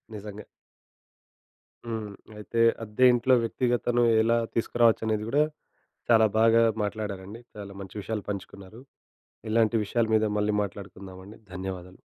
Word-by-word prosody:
నిజంగా. 105 0 -8 1.4
హ్మ్. 110 -3 -5 0.2
అయితే, 105 +2 -3 0.2
అద్దె 110 +4 +2
ఇంట్లో 125 +2 +3
వ్యక్తిగతను 120 +1 0 0.2
ఎలా 115 +1 +2 0.2
తీసుకురావచ్చనేది 110 -2 +1
కూడా, 145 +4 +3 0.7
చాలా 110 -1 +6
బాగా 115 +1 +5 0.2
మాట్లాడారండి. 105 0 -5 0.2
చాలా 100 -1 -8
మంచి 95 +2 -10
విషయాలు 105 0 -4
పంచుకున్నారు. 100 +2 -8 0.7
ఇలాంటి 115 +1 +2
విషయాల 115 +3 0
మీద 110 - +2
మళ్ళీ 105 0 0
మాట్లాడుకుందామండి. 95 0 -10 0.2
ధన్యవాదాలు. 95 -1 -7
110 Hz, 110 wpm, -26 LUFS, 100-115 Hz, 1.4 s, చాలా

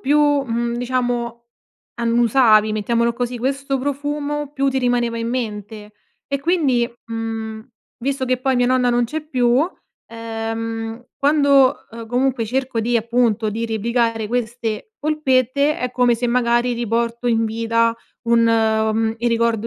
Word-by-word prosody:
più, 290 +3 +2
mhmm, 260 -5 +1
diciamo, 240 -1 -2 0.5
annusavi, 230 -2 +3
mettiamolo 235 +2 0
così, 245 0 -3
questo 275 +2 -1
profumo, 290 +1 -3
più 275 -1 0
ti 265 0 0
rimaneva 245 -2 0
in 230 0 -3
mente. 215 -3 -5 0.3
E, 280 - -2
quindi, 275 -7 +1 0.2
mhmm, 225 -1 -5 0.3
visto 265 +1 -2
che 255 0 +2
poi 260 0 0
mia 245 - +3
nonna 250 -1 +2
non 240 0 +2
c'è 305 +6 -4
più, 255 0 +2 0.4
ehm, 225 0 -5
quando, 280 -2 +3
uhm, 230 0 -8
comunque 250 0 0
cerco 255 +1 -2
di 235 +2 +1
appunto, 230 -1 +1
di 225 +2 -3
replicare 230 0 0
queste 235 - -3
polpette, 285 -1 +1
è 250 - -2
come 245 -1 +3
se 240 +2 -2
magari 240 0 +2
riporto 235 +1 -1
in 225 -1 +2
vita 230 +1 +1 0.3
un 230 0 +4
uhm, 220 0 +2
il 240 - +1
ricordo 230 -1 +1
240 Hz, 140 wpm, -20 LUFS, 230-260 Hz, 0.5 s, un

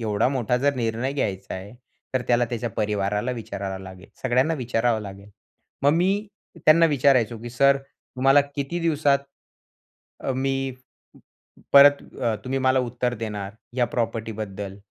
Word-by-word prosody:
एवढा 110 +1 +1
मोठा 125 -2 0
जर 140 +1 +2
निर्णय 120 +2 -1
घ्यायचा 100 -8 -3
आहे. 95 +3 -8 0.4
तर 130 - +1
त्याला 120 0 +4
त्याच्या 120 -1 -4
परिवाराला 105 +2 -1
विचारावं 100 -4 -5
लागेल, 95 0 -11
सगळ्यांना 130 +6 +2
विचारावं 120 -3 0
लागेल. 100 0 -10 0.5
मग 140 - +5
मी, 195 +5 +1 0.4
त्यांना 165 +2 +7
विचारायचो, 130 -6 +2
की 120 - -6
सर 140 +3 +4
तुम्हाला 135 0 +1
किती 140 +5 -3
दिवसात 150 -4 +2 1.0
अ, 135 - -2
मी 135 0 -1 1.0
परत 140 0 +8 0.2
अ, 115 -3 +1
तुम्ही 135 +1 -1
मला 130 0 +3
उत्तर 125 0 -2
देणार, 105 -3 -5 0.2
या 125 - +3
प्रॉपर्टीबद्दल? 110 -4 -3
120 Hz, 135 wpm, -24 LUFS, 105-135 Hz, 1.0 s, परत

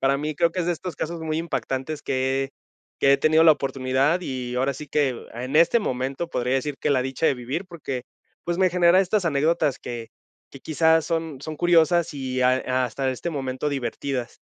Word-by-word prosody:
para 135 +1 +3
mí 150 +2 -3
creo 170 +3 +2
que 180 - -3
es 170 - -2
de 175 - +2
estos 175 +1 -6
casos 170 +1 -4
muy 160 -1 -2
impactantes 155 -3 -3
que 130 +1 0
he 135 - -9 0.5
que 140 - +5
he - - +6
tenido 155 +1 +4
la 160 - +9
oportunidad 135 +3 0
y 125 -5 -4
ahora 135 +2 +1
sí 150 +3 -8
que, 135 -4 0
a 120 +2 -5
en 135 +4 -2
este 170 +8 +5
momento 135 - -3
podría 125 -2 0
decir 135 +2 -1
que - - 0
la 130 -2 +3
dicha 135 +5 -1
de - - +3
vivir 130 +9 -4
porque, 145 -8 -5 0.4
pues, 175 0 -1
me 185 0 +3
genera 175 +1 +5
estas 195 0 +1
anécdotas 150 -1 +1
que 120 -2 -7 0.4
que 135 - -12
quizá, 160 +2 +3
son 160 -3 -3
son 155 +2 -6
curiosas 170 -1 +3
y 130 -2 -3
ha, 125 0 +4
eh, - - -7
hasta 130 +1 0
este 130 +6 -4
momento 135 -1 -3
divertidas. 135 -1 -3
140 Hz, 210 wpm, -24 LUFS, 130-165 Hz, 0.5 s, la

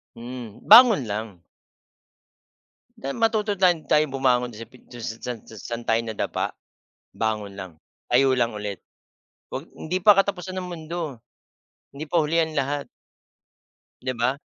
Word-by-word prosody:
Mm, 120 -2 -8
bangon 230 - +8
lang. 105 -3 -5 1.6
Tay 135 +1 -4
matuto 220 -2 +1
tayong 180 -4 +2
tayong 150 0 +3
bumangon 125 -2 +1
sa 115 - -7
pin 125 +3 -19
san 120 0 -6
sa - - -14
saan 115 +2 -6
tayo 115 0 +2
nadapa. 110 -2 -3 0.6
Bangon 105 -3 -2
lang. 95 -5 -9 0.3
Tayo 130 +2 +4
lang 120 -2 +1
ulit. 105 -2 -5 0.7
'Wag - - -5
hindi 180 +4 -3
pa 205 +1 +7
katapusan 190 -2 0
ng 185 - -3
mundo. 160 -6 -6 0.7
Hindi 145 - -5
pa 165 +2 +1
huli 165 +2 +2
ang 160 - -4
lahat. 140 +1 -2 1.1
'Di 130 0 -2
ba? 120 +3 0
130 Hz, 135 wpm, -24 LUFS, 115-170 Hz, 1.6 s, bangon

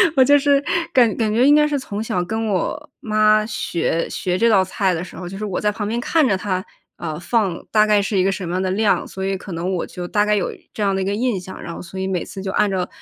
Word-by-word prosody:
我 265 - +7
就 285 +2 +6
是 280 0 +3 0.3
感 240 -5 +4
感 220 -2 +1
觉 240 +3 +4
应 290 - +7
该 300 0 +4
是 295 -1 0
从 215 -5 -5
小 180 -5 -1
跟 220 +4 -2
我 215 - -2
妈 215 -3 +3
学 170 -6 -2
学 180 0 -2
这 230 +2 +3
道 195 -3 +5
菜 190 0 0
的 165 0 -3
时 - - -11
候， 180 - -6
就 195 - -7
是 215 - -4
我 195 -3 -2
在 210 0 +2
旁 205 0 -4
边 230 +2 -1
看 310 +3 +2
着 195 - +2
她， 185 -1 -2 0.3
啊， 160 -3 -5
放 195 -3 0
大 215 -1 +5
概 210 -1 +3
是 200 0 -1
一 185 - +3
个 195 - +2
什 195 -1 -4
么 175 - -3
样 185 - 0
的 190 - -1
量， 210 +1 +1
所 190 - -6
以 195 0 -1
可 195 - -10
能 175 +3 -2
我 175 - -2
就 180 -1 -7
大 205 +3 +2
概 210 0 +2
有 195 - -1 0.2
这 - - -6
样 195 -1 +1
的 190 - -1
一 - - -1
个 200 - -1
印 230 -1 0
象。 185 +1 -9
然 170 - -6
后 - - -7
所 180 +2 -8
以 190 - -2
每 185 -3 -1
次 195 - -8
就 190 0 -3
按 210 +1 +2
照， 185 -1 -1
200 Hz, 315 characters per minute, -20 LUFS, 185-220 Hz, 0.3 s, 我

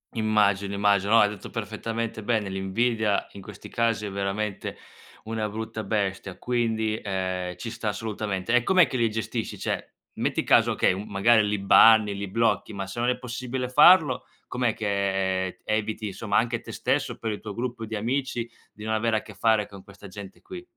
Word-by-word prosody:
Immagino, 100 -3 +2
immagino, 100 0 +2
no, 115 - +8
hai 105 - +4
detto 105 -2 -8
perfettamente 115 -1 -4
bene: 110 -3 0
l'invidia 105 +3 0
in 100 - -11
questi 105 0 -11
casi 115 -2 0
è 100 - -5
veramente 100 +1 -3 0.5
una 110 -1 -3
brutta 110 +1 -5
bestia, 95 -2 -2
quindi, 110 -3 -1
ehm, 95 -2 -3
ci 115 +5 -6
sta 115 -1 -5
assolutamente. 105 -1 -3
E 125 - +5
com'è 185 +3 +5
che 130 - -3
li 115 -2 +2
gestisci? 110 -1 -4
Cioè, - - -3 0.2
metti - - -1
caso, - - +4
okay, - - +2
uhm, 100 +3 -5
magari 105 +2 +4
li 105 0 0
banni 105 +1 +6
li 100 0 -4
blocchi, 115 +2 0
ma 100 -1 -4
se 95 +5 -7
non 120 - +2
è 125 - 0
possibile 125 0 -4
farlo 150 0 +6 0.2
com'è 125 -3 0
che, 95 -2 0
ehm, 95 - -7
eviti 110 0 -2
insomma 100 +1 -1
anche 120 +1 0
te - - -9
stesso, - - -1
per 115 - -3
il 105 - -4
tuo 105 -2 -7
gruppo 120 -1 -4
di 110 - -4
amici 120 +2 -2 0.2
di 105 - -12
non 110 - -1
avere 110 0 +1
a - - -2
che 105 - -12
fare 105 +1 +2
con 100 -2 -12
questa 100 +1 -13
gente 95 0 -10
qui? 365 -2 -9
110 Hz, 190 wpm, -26 LUFS, 100-115 Hz, 0.5 s, no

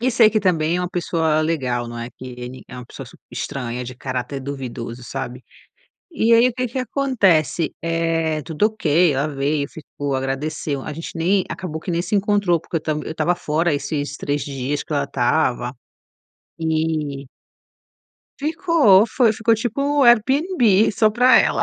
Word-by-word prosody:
E 255 +2 +1
sei 230 -3 +6
que 220 - +2
também 170 -3 +1
é - - -1
uma 180 - -2
pessoa 160 -3 0
legal, 130 -7 -1
não 120 0 -7
é 115 - -5
que 125 - -13
ele 125 +1 -8
é 125 - -9
uma 125 - -8
pessoa - - -10
super - - -18
estranha, 125 -2 -4
de 125 - -7
caráter 130 +2 -4
duvidoso, 125 -3 -6
sabe? 125 +1 -6 0.7
E 235 -8 +2
aí 235 +2 +6
o - - -4
que 250 0 -1
que 245 +2 -5
acontece, 205 - +1
eh, 165 -2 0
tudo 165 +6 +1
ok, 170 -6 +2
ela 140 +3 0
veio, 140 0 -1
ficou, 145 -4 -5
agradeceu. 135 +2 -3
A 150 - -5
gente 165 +3 -6
nem 180 +4 +1
acabou 165 -2 -5
que 180 - -5
nem 170 0 0
se 180 - -3
encontrou, 200 -3 +2
porque 165 - -5
eu - - 0
tam 155 0 -2
eu - - -4
estava 175 +2 +1
fora 165 0 0
esses 145 0 -3
3 145 0 -2
dias 140 +1 -3
que - - -8
ela 145 -1 +1
estava 125 -2 0 0.8
e 155 -4 -1 1.1
Ficou, 305 - +4
foi, 235 0 +2
ficou 225 +1 +1
tipo 275 +5 0
Airbnb 240 - +4
só 215 +1 +3
para 250 +4 +5
ela. - - +3
160 Hz, 175 wpm, -21 LUFS, 140-210 Hz, 1.1 s, sei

